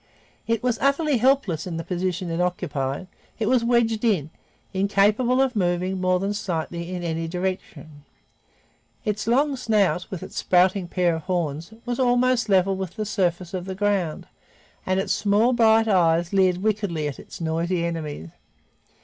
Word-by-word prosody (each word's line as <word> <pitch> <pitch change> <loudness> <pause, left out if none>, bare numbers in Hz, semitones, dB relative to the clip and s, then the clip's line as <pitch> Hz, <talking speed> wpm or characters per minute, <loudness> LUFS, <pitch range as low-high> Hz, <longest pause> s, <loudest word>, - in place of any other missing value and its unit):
It 230 0 0
was 245 -3 0
utterly 280 +1 +2
helpless 230 - +1
in 170 -2 -4
the 165 - -4
position 180 -1 -2
it 165 +1 -1
occupied. 145 -4 -2 0.3
It 220 - -1
was 250 -1 +3
wedged 235 -2 +2
in, 180 -10 +1 0.4
incapable 205 +6 +2
of 260 -2 -1
moving 185 0 0
more 185 0 +2
than 200 +2 -1
slightly 170 -3 -4
in 180 -1 -4
any 165 -1 -2
direction. 180 -3 -5 1.0
Its 210 0 -2
long 275 +4 +2
snout, 210 -7 +1
with 185 - -6
its - - -9
sprouting 185 +1 +2
pair 175 -2 +1
of - - -7
horns, 165 -1 -2
was 245 0 -3
almost 245 -2 +2
level 190 0 +3
with 190 -2 -5
the 215 - -3
surface 180 -4 -1
of 180 -1 -4
the 190 0 -5
ground 195 -5 -1 0.6
and 185 0 +1
its 195 - 0
small 210 +4 +2
bright 225 -1 +4
eyes 175 -3 +2
leered 185 -1 +2
wickedly 205 -8 -1
at 140 - -6
its - - -11
noisy 170 +2 -1
enemies. 155 - -5
190 Hz, 160 wpm, -24 LUFS, 170-220 Hz, 1.0 s, bright